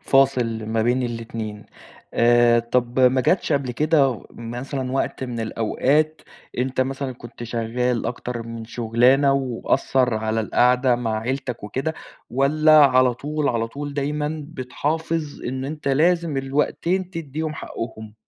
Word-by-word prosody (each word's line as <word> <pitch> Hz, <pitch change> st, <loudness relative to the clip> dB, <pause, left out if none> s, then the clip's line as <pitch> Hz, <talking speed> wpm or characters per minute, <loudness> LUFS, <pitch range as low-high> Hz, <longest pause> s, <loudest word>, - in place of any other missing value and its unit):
فاصل 125 Hz, -5 st, +2 dB
ما 110 Hz, 0 st, 0 dB
بين 125 Hz, +3 st, +1 dB
الاتنين. 115 Hz, -3 st, -5 dB, 0.5 s
آآ، 120 Hz, 0 st, +5 dB
طَب 120 Hz, +2 st, 0 dB
ما 130 Hz, 0 st, +5 dB
جاتش 175 Hz, +9 st, +1 dB
قبل 140 Hz, -3 st, 0 dB
كده 140 Hz, -2 st, +2 dB
مثلًا 125 Hz, +3 st, -5 dB
وقت 135 Hz, -1 st, -1 dB
من 120 Hz, -2 st, -4 dB
الأوقات 140 Hz, +8 st, 0 dB, 0.4 s
أنت 130 Hz, +1 st, 0 dB
مثلًا 135 Hz, 0 st, -2 dB
كنت 120 Hz, -1 st, -11 dB
شغّال 120 Hz, +1 st, -1 dB
أكتر 120 Hz, 0 st, -4 dB
من 115 Hz, 0 st, -7 dB
شُغلانة 120 Hz, +4 st, +3 dB
وأثّر 130 Hz, -1 st, +1 dB
على 110 Hz, +1 st, -1 dB
القعدة 125 Hz, +3 st, +3 dB
مع 115 Hz, -3 st, -1 dB
عيلتك 125 Hz, -1 st, -3 dB
وكده 135 Hz, +9 st, -3 dB, 0.4 s
والّا 155 Hz, +4 st, +4 dB
على 130 Hz, -2 st, +3 dB
طول، 150 Hz, +3 st, -2 dB
على 115 Hz, -2 st, 0 dB
طول 145 Hz, +2 st, -6 dB
دايمًا 150 Hz, +2 st, -2 dB
بتحافظ 155 Hz, +2 st, -3 dB
إنه 130 Hz, +2 st, -3 dB
أنت 150 Hz, -2 st, -4 dB
لازم 165 Hz, +2 st, +2 dB
الوقتين 150 Hz, +7 st, -1 dB
تدّيهم 155 Hz, -2 st, -4 dB
حقّهم؟ 110 Hz, -5 st, -7 dB
130 Hz, 130 wpm, -22 LUFS, 120-145 Hz, 0.5 s, آآ